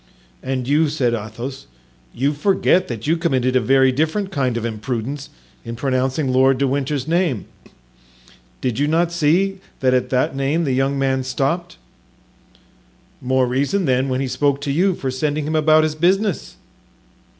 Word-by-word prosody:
"And 130 Hz, -1 st, -3 dB
you," 150 Hz, +2 st, +3 dB
said 130 Hz, -6 st, 0 dB
Athos, 115 Hz, -, -6 dB, 0.4 s
"you 140 Hz, -, 0 dB
forget 185 Hz, +3 st, +2 dB
that 115 Hz, -3 st, -6 dB
you 160 Hz, +3 st, +2 dB
committed 130 Hz, -7 st, 0 dB
a 130 Hz, -, +4 dB
very 130 Hz, +1 st, +4 dB
different 160 Hz, +9 st, -1 dB
kind 130 Hz, -7 st, 0 dB
of 115 Hz, -, -3 dB
imprudence 120 Hz, +5 st, -4 dB, 0.3 s
in 115 Hz, 0 st, -6 dB
pronouncing 130 Hz, +2 st, -1 dB
Lord 130 Hz, +1 st, +4 dB
de 140 Hz, +1 st, +1 dB
Winter's 140 Hz, +1 st, -2 dB
name. 165 Hz, -, 0 dB, 1.2 s
Did 125 Hz, -2 st, -2 dB
you 145 Hz, -, +2 dB
not 165 Hz, +2 st, +1 dB
see 175 Hz, +4 st, +1 dB, 0.2 s
that 130 Hz, -1 st, +2 dB
at 125 Hz, -1 st, +1 dB
that 130 Hz, +1 st, 0 dB
name 140 Hz, +5 st, 0 dB
the 135 Hz, -4 st, 0 dB
young 135 Hz, +2 st, +1 dB
man 135 Hz, -1 st, 0 dB
stopped?" 135 Hz, -, -2 dB, 1.4 s
"More 130 Hz, 0 st, +2 dB
reason, 140 Hz, +10 st, 0 dB
then, 130 Hz, 0 st, +1 dB
when 130 Hz, +1 st, -1 dB
he 135 Hz, -, -1 dB
spoke 140 Hz, +2 st, 0 dB
to 145 Hz, -1 st, -2 dB
you, 180 Hz, +5 st, +2 dB
for 135 Hz, -5 st, -3 dB
sending 145 Hz, +3 st, -1 dB
him 155 Hz, +1 st, -2 dB
about 155 Hz, 0 st, +4 dB
his 155 Hz, -1 st, 0 dB
business." 185 Hz, +4 st, 0 dB
135 Hz, 160 wpm, -20 LUFS, 130-155 Hz, 1.4 s, a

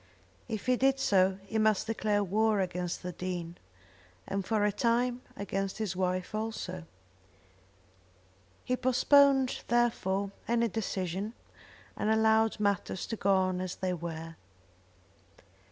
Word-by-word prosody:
If 220 Hz, -4 st, -4 dB
he 255 Hz, -1 st, +3 dB
did 270 Hz, +1 st, +3 dB
so 190 Hz, -5 st, +3 dB
he 220 Hz, +2 st, -2 dB
must 215 Hz, -2 st, +3 dB
declare 210 Hz, -2 st, 0 dB
war 215 Hz, +2 st, +2 dB
against 180 Hz, -2 st, -2 dB
the 180 Hz, -, -4 dB
Dean, 175 Hz, -1 st, -5 dB, 0.7 s
and, 195 Hz, 0 st, -2 dB
for 210 Hz, +1 st, +1 dB
a 210 Hz, -, +2 dB
time, 240 Hz, +2 st, +1 dB, 0.2 s
against 195 Hz, -1 st, -3 dB
his 210 Hz, -5 st, -2 dB
wife 185 Hz, +1 st, -1 dB
also. 215 Hz, -5 st, -4 dB, 1.8 s
He 250 Hz, -, +1 dB
postponed, 265 Hz, +1 st, +4 dB
therefore, 200 Hz, -5 st, +1 dB, 0.2 s
any 235 Hz, 0 st, +2 dB
decision, 195 Hz, 0 st, -3 dB, 0.6 s
and 210 Hz, -, -1 dB
allowed 220 Hz, 0 st, +3 dB
matters 200 Hz, -3 st, -1 dB
to 225 Hz, -, -4 dB
go 200 Hz, -2 st, +1 dB
on 185 Hz, -1 st, +1 dB
as 185 Hz, -1 st, -4 dB
they 185 Hz, -1 st, -2 dB
were. 165 Hz, -1 st, -6 dB
205 Hz, 125 wpm, -30 LUFS, 185-225 Hz, 1.8 s, postponed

